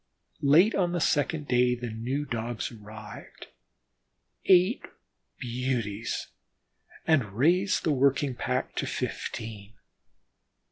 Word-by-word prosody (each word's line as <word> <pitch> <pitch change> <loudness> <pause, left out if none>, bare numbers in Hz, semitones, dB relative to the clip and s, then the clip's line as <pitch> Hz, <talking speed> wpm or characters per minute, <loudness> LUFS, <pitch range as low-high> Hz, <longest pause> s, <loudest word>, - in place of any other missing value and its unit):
Late 165 +10 +5
on 175 -2 +1
the 175 - 0
second 150 -1 +1
day 125 0 +3
the 120 -1 -5
new 125 +6 -3
Dogs 120 -2 -3
arrived 105 -1 -11 1.0
eight 185 +5 +5 0.6
beauties 120 -4 -2 0.8
and 130 -11 +2
raised 180 +9 +3
the 155 - +2
working 140 0 +2
pack 125 +1 -2
to - - -1
fifteen. 110 -1 -5
125 Hz, 100 wpm, -28 LUFS, 115-150 Hz, 1.0 s, Late